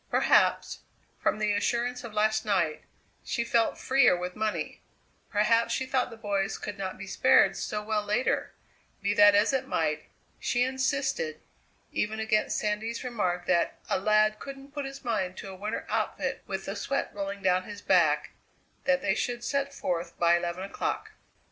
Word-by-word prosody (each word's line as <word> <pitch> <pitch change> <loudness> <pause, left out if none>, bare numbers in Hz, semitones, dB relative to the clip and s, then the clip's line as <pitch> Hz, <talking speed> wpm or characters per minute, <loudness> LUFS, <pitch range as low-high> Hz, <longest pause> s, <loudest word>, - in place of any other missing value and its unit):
Perhaps, - - +3 0.4
from - - +1
the 210 -1 +1
assurance 240 +4 0
of 235 - -7
last 215 +1 +1
night, 180 -7 0 0.4
she 235 - -1
felt 230 -1 +1
freer 255 -8 +4
with 180 0 -5
money; 215 0 -2 0.5
perhaps 230 +2 +2
she 260 - -2
thought 260 -1 0
the 230 - -10
boys 200 -3 -1
could 205 - -6
not 190 -2 -5
be 195 - -7
spared 195 0 +4
so 210 0 -3
well 215 0 0
later; 210 +5 0 0.5
be 200 +1 +2
that 205 0 +7
as 210 +6 +4
it 265 -1 0
might, 155 - -1 0.3
she 245 - +1
insisted, 280 - -1 0.5
even 215 +1 -1
against 220 -1 +1
Sandy's 215 +3 -2
remark 185 -8 -1
that 175 -2 +1
"a - - +2
lad 215 +1 +3
couldn't 275 0 -9
put 290 -1 -3
his 275 0 -8
mind 185 -6 -1
to 195 - -7
a - - -9
winter 205 +3 -4
outfit - - -2
with - - -4
the - - -4
sweat - - -2
rolling 200 0 -5
down 185 0 +2
his 205 -1 -9
back," - - +3 0.5
that 270 0 +2
they 195 - +2
should 240 +3 -2
set 280 +2 -1
forth 170 -9 -3
by 170 0 +4
eleven 175 +1 -2
o'clock. 195 - -3
215 Hz, 170 wpm, -28 LUFS, 195-245 Hz, 0.5 s, that